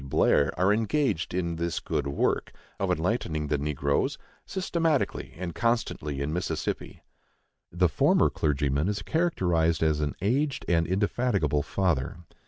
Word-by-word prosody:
Blair 70 +1 +3
are 95 +3 +4
engaged 110 - 0
in 85 -2 -2
this 85 0 -1
good 70 - -2
work 70 - 0 0.3
(of - - 0
enlightening 80 -4 -1
the 75 - +2
negroes) 70 -1 0 0.3
systematically 165 -6 -1
and 85 -1 -4
constantly 90 - -1
in 75 +2 -2
Mississippi." 90 +2 -3 0.7
The 90 +1 +3
former - - +3
clergyman 70 +1 0
is 105 - -2
characterized 90 - +1
as 80 -1 +2
an 75 -1 -1
"aged 135 +8 0
and 85 -1 +2
indefatigable 100 - +1
father." 80 -5 -1
85 Hz, 130 wpm, -27 LUFS, 75-105 Hz, 0.7 s, are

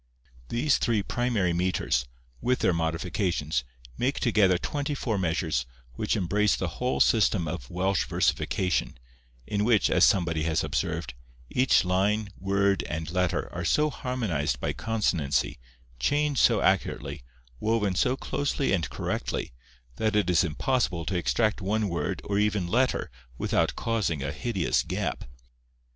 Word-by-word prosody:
These 130 +4 +2
three 110 -4 +1
primary 115 -8 0
metres, 85 -8 0 0.3
with 125 +1 +2
their 90 - +3
modifications, 80 - -1 0.4
make 135 +3 0
together 105 -6 +3
twenty 145 +8 -3
four 110 -7 -1
measures, 80 -7 0 0.3
which - - -1
embrace 105 +2 +2
the 90 - -2
whole 125 +1 0
system 105 -6 +3
of 75 -6 -5
Welsh 95 +1 0
versification, 90 -9 0 0.5
in 105 +4 -1
which, 110 -2 +3
as - - +4
somebody 85 -4 +3
has 80 0 0
observed, 70 -4 -2 0.4
each 130 -6 +3
line, 100 +3 +1
word, 100 +1 +2
and 80 -1 -4
letter, 90 -1 0
are 85 - -4
so 150 - +2
harmonized 90 - -2
by - - -2
consonancy, 80 - 0 0.4
chained 145 - +1
so 115 -4 +4
accurately, 95 -7 0 0.4
woven 105 -1 +1
so 125 +7 +1
closely 140 -3 -1
and 85 -4 0
correctly, - - -3 0.4
that 110 -1 0
it 100 -4 +2
is 85 -1 +4
impossible 85 - 0
to 95 - -2
extract 105 +5 +1
one 105 +2 0
word 85 -3 -3
or 100 0 0
even 105 -3 +1
letter 125 - +1 0.3
without - - +1
causing 105 -11 -1
a 70 - -2
hideous 95 - 0
gap. - - -3
95 Hz, 140 wpm, -27 LUFS, 85-115 Hz, 0.5 s, as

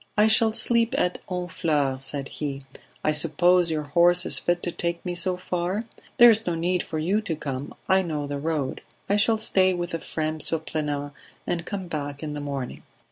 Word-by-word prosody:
"I 210 - +6
shall 220 +1 +4
sleep 235 +2 +2
at 180 -7 0
Honfleur," 160 -7 -1
said 140 0 -4
he, 140 -2 -5 0.4
"I 155 - +3
suppose 175 +3 +4
your 155 -1 -1
horse 175 +5 +4
is - - +2
fit 175 0 0
to 175 - -2
take 170 +1 -3
me 180 - -2
so 180 +1 +2
far? 180 +3 -2 0.3
There 240 -1 +9
is 220 -1 +1
no 175 - 0
need 175 +2 0
for 160 - -5
you 185 +7 +1
to 170 -6 -3
come, 140 -2 -5
I 190 0 +4
know 155 -5 -3
the 145 0 -4
road. 150 -3 -2 0.3
I 200 - +2
shall 220 +2 +3
stay 185 -3 +3
with 175 0 -4
Ephrem, 155 -1 -3
Surprenant, 150 -2 -2 0.3
and 170 0 -3
come 195 -2 -4
back 145 -2 -5
in 150 -1 -4
the 145 - -5
morning." 140 -3 -5
170 Hz, 190 wpm, -25 LUFS, 150-185 Hz, 0.4 s, There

